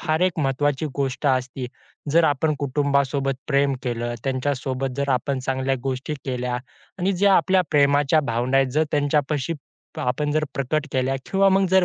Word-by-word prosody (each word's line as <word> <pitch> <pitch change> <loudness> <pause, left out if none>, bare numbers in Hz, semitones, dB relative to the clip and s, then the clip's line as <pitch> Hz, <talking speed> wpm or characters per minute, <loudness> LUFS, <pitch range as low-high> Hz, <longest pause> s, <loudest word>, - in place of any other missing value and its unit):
फार 155 0 0
एक 180 -2 +1
महत्वाची 145 +1 0
गोष्ट 140 +1 -1
असते. 130 -1 0 0.5
जर 165 0 +5
आपण 150 +1 +2
कुटुंबासोबत 140 -1 0
प्रेम 140 -1 +2
केलं, 120 -2 -2
त्यांच्यासोबत 135 0 -1
जर 140 0 -1
आपण 135 +2 0
चांगल्या 130 +1 -1
गोष्टी 135 +3 -3
केल्या 125 -2 -2 0.4
आणि 190 +2 +1
ज्या 195 +2 +4
आपल्या 190 -1 +4
प्रेमाच्या 145 +1 +4
भावना 125 0 0
आहेत 135 0 +4
जर 155 - +3
त्यांच्यापाशी 145 0 0 0.4
प - - -9
आपण 135 +4 -1
जर 155 0 +1
प्रकट 150 +3 -1
केल्या 130 0 +1
किंवा 195 0 +3
मग 195 0 +3
जर 190 -1 +5
140 Hz, 160 wpm, -23 LUFS, 130-155 Hz, 0.5 s, जर